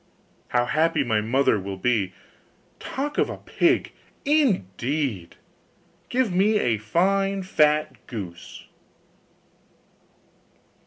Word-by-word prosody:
How 120 0 +1
happy 160 +1 +2
my 110 -4 +1
mother 120 0 +2
will 95 0 -6
be! 100 -3 0 0.7
Talk 290 +3 -4
of - - +2
a - - -5
pig, - - +1 0.3
indeed! 140 - 0 0.7
Give 245 -6 +1
me 205 +4 +3
a 115 - +1
fine 195 - +1
fat 150 -4 +1
goose. 95 -7 -8
140 Hz, 95 wpm, -24 LUFS, -, 0.7 s, me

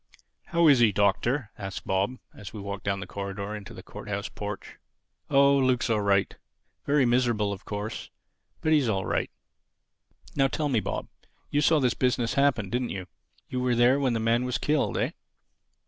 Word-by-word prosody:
"How 170 -2 +3
is 140 -4 +7
he, 115 -3 +5
Doctor?" 105 +5 +1
asked 95 -2 -6
Bob 100 +7 0 0.2
as 105 - -10
we 110 - -6
walked 100 0 -5
down 100 -1 -1
the - - -5
corridor 100 +2 -5
into 105 -2 -9
the - - -10
Court - - -10
house - - -3
porch. - - -7 0.5
"Oh, 140 0 +5
Luke's 130 -3 +2
all 110 -2 +2
right. 100 -1 +2 0.5
Very 145 -2 +4
miserable 120 -4 +2
of 95 - -10
course, 105 +1 -5 0.5
but 155 - +2
he's 145 -6 +3
all 95 -3 0
right. - - -1 1.1
Now 135 -1 +4
tell 145 +4 -2
me, 125 -5 +2
Bob: - - -4 0.4
you 145 - +2
saw 155 +1 +4
this 125 -4 +2
business 125 -2 0
happen, 135 -9 +2
didn't 125 0 -1
you? 95 -2 -5 0.4
You 125 - -3
were 125 -1 +1
there 120 +3 +4
when 130 -3 +1
the 115 - 0
man 115 +2 +2
was 125 -1 -1
killed, 150 -1 0
eh?" - - 0
120 Hz, 185 wpm, -27 LUFS, 100-135 Hz, 1.1 s, is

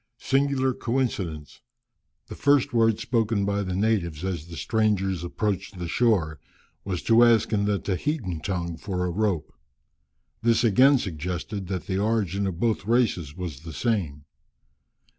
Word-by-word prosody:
Singular 135 -1 +1
coincidence! 105 - -3 0.6
The - - -9
first 145 -1 +2
word 115 -2 +3
spoken 110 -4 0
by 100 0 0
the 95 -2 -3
natives 95 -6 0
as 85 -4 -3
the 85 -1 -9
strangers 100 -6 0
approached 100 +1 -3
the 90 -1 -4
shore, 85 - +1 0.4
was 95 -3 -3
to 115 +1 +5
ask 115 -1 +4
in 100 -1 +2
the 105 -1 +1
Tahitan 95 - -2
tongue 85 0 -3
for 90 0 -3
a 90 - -1
rope. 95 -5 -1 0.9
This 115 0 +3
again 130 +6 +5
suggested 90 - -4
that 95 -2 -4
the 95 -1 -1
origin 100 -3 0
of 90 -3 -4
both 110 -3 0
races 110 - +1
was 85 -7 -5
the 80 0 -9
same. 85 - -2
100 Hz, 145 wpm, -25 LUFS, 85-115 Hz, 0.9 s, to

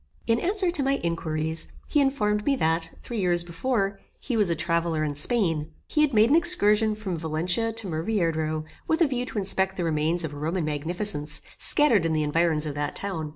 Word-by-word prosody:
In 230 0 +2
answer 375 +1 +1
to 330 -4 0
my 275 0 +1
inquiries, 160 -1 -1 0.2
he 300 - +1
informed 210 -7 +1
me 280 +3 +2
that, 165 -6 0
three 235 -2 -5
years 175 -2 +3
before, 195 +3 -2 0.2
he 250 - -3
was 210 -5 +3
a 170 - +1
traveller 165 -1 0
in 150 -1 -2
Spain. 165 - 0 0.2
He 300 - +1
had 300 -2 +3
made 225 +1 +4
an - - +6
excursion 220 -11 +5
from 190 -6 -4
Valencia 175 +8 0
to 225 -2 -3
Murviedro, 160 -3 -1 0.2
with 320 +2 +1
a - - +3
view 250 -2 -3
to - - -7
inspect 190 -1 +1
the 180 - -1
remains 165 +2 0
of 155 -2 -4
Roman 160 +4 -2
magnificence, 155 0 -2 0.2
scattered 250 - +3
in 160 - -1
the 155 -1 +1
environs 155 0 +1
of 150 - -3
that 145 0 -3
town. 165 -6 -4
175 Hz, 200 wpm, -25 LUFS, 160-225 Hz, 0.2 s, an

